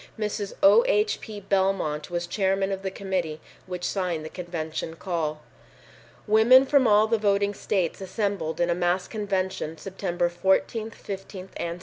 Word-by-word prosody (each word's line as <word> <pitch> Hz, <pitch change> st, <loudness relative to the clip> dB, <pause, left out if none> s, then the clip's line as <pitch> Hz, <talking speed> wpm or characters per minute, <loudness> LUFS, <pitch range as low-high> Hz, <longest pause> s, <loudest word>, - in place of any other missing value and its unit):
Mrs. 210 Hz, -2 st, -3 dB
O. 305 Hz, +11 st, +8 dB
H. 425 Hz, -3 st, +2 dB
P. 215 Hz, -2 st, -7 dB
Belmont 190 Hz, -6 st, 0 dB
was 175 Hz, 0 st, -2 dB
chairman 195 Hz, +2 st, 0 dB
of 195 Hz, 0 st, -3 dB
the 195 Hz, -, -2 dB
committee 185 Hz, -5 st, -3 dB, 0.3 s
which 180 Hz, -1 st, -5 dB
signed 175 Hz, -4 st, -1 dB
the -, -, -6 dB
convention 160 Hz, -2 st, -5 dB
call. 160 Hz, -4 st, -3 dB, 0.8 s
Women 225 Hz, +5 st, +6 dB
from 275 Hz, -2 st, +4 dB
all 210 Hz, 0 st, +5 dB
the 225 Hz, 0 st, +1 dB
voting 200 Hz, -1 st, +2 dB
states 190 Hz, -3 st, -1 dB
assembled 195 Hz, -5 st, -2 dB
in 175 Hz, 0 st, +2 dB
a -, -, +1 dB
mass 180 Hz, +1 st, 0 dB
convention 190 Hz, -6 st, -2 dB
September 175 Hz, 0 st, -2 dB
14, 190 Hz, +5 st, 0 dB
15 195 Hz, -3 st, -8 dB
and 170 Hz, 0 st, -3 dB
16. -, -, -13 dB
190 Hz, 155 wpm, -26 LUFS, 175-205 Hz, 0.8 s, O